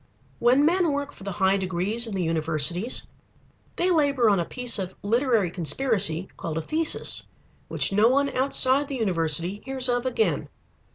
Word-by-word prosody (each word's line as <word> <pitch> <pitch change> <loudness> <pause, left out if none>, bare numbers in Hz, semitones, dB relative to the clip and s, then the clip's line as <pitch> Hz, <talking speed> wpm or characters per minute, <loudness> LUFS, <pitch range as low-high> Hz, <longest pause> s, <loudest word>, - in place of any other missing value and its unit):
When 255 +5 +3
men 345 0 +2
work 285 0 -3
for - - -14
the 195 -1 -5
high 190 +1 +1
degrees 190 +5 -1
in 210 - -5
the 185 - -1
universities, 165 - +2 0.7
they 365 +1 0
labor 280 -8 +2
on 195 - +2
a 170 - -1
piece 250 0 -1
of 190 -1 -5
literary 225 -4 +1
conspiracy 185 - -1
called 160 -1 -5
a - - -1
thesis 315 - 0 0.4
which - - +1
no 210 +3 +4
one 280 +2 +1
outside 270 +1 +2
the 275 - -5
university 175 - -1
hears 265 -1 -1
of 245 +1 -1
again. 220 - -1
220 Hz, 165 wpm, -24 LUFS, 180-265 Hz, 0.7 s, no